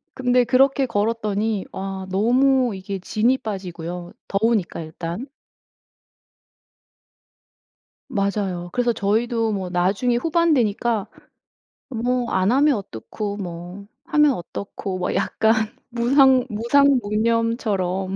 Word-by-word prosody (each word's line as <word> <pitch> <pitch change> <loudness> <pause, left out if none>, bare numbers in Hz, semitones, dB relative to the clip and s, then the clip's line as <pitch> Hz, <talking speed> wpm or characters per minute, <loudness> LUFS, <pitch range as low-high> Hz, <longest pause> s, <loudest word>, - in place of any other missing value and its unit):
근데 250 -1 +2
그렇게 270 +3 +3
걸었더니 215 -2 -1
와 190 0 -5
너무 250 +4 +3
이게 195 +1 -5
진이 225 +7 +1
빠지고요 180 -4 -6 0.2
더우니까 210 -3 0
일단. 165 +8 -6 2.8
맞아요. 195 -6 -2
그래서 245 -1 +1
저희도 225 +2 0
뭐 190 -3 -3
나중에 195 +7 +1
후반 330 +5 +2
되니까 225 -3 0 0.8
뭐 245 0 -1
안 190 +3 +2
하면 280 +2 +4
어떻고 200 - -6
뭐 180 +1 -7 0.2
하면 300 -2 +4
어떻고 195 -1 -6
뭐 180 - -1
약간 220 0 +2 0.4
무상 255 +2 +4
무상무념처럼 225 -5 +1
215 Hz, 225 characters per minute, -22 LUFS, 190-245 Hz, 2.8 s, 하면